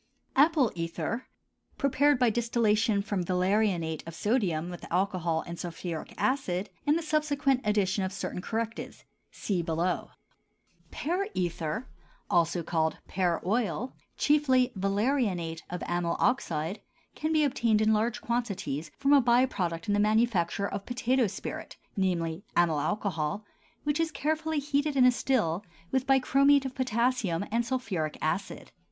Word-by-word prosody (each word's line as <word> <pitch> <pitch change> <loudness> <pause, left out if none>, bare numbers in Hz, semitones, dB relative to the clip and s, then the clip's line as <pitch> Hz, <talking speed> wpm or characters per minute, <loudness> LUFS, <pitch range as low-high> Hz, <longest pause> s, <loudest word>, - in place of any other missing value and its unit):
APPLE 290 -4 +4
ETHER, 170 +8 -3 0.5
prepared 280 +1 +3
by 245 -2 +3
distillation 220 -3 +2
from 205 -3 -1
valerianate 180 -3 +1
of 165 - -7
sodium 180 -5 0
with 175 - -9
alcohol 175 -3 0
and 170 0 -7
sulphuric 170 -1 -5
acid, 210 -8 0 0.2
and 295 +2 +4
the 335 - -3
subsequent 290 -4 +1
addition 205 -2 +1
of 190 - -2
certain 185 -1 -4
correctives 225 +3 -4 0.2
(see 190 -4 -2
below). 170 +2 -1 0.8
PEAR 360 +6 -2
ETHER, 175 +6 -2 0.4
also 170 0 +2
called 160 -1 0
pear 180 -3 0
oil, 220 +2 0 0.2
chiefly 260 -4 +3
valerianate 195 -5 0
of 180 0 -4
amyl 175 -1 -1
oxide, 180 - 0 0.3
can 310 +1 -2
be 310 -1 +3
obtained 235 -6 +2
in 215 0 +3
large 230 +3 0
quantities 200 - -2
from 280 +1 +3
a 280 - +7
by 240 +1 +4
product 170 -9 -3
in 205 - +2
the 205 - +2
manufacture 210 -3 +2
of 200 0 -5
potato 245 0 +1
spirit, - - -6 0.2
namely, 175 -2 -1
amyl 165 -4 +3
alcohol, 185 +1 -2 0.4
which 295 +1 0
is 330 0 +1
carefully 315 +1 -1
heated 290 0 0
in 260 -2 +6
a 250 - +7
still 210 -9 0 0.3
with 265 0 0
bichromate 275 +1 +4
of 265 - -3
potassium 235 -7 0
and 235 +1 +1
sulphuric 195 - -2
acid. 185 +6 -3
210 Hz, 140 wpm, -29 LUFS, 175-260 Hz, 0.8 s, a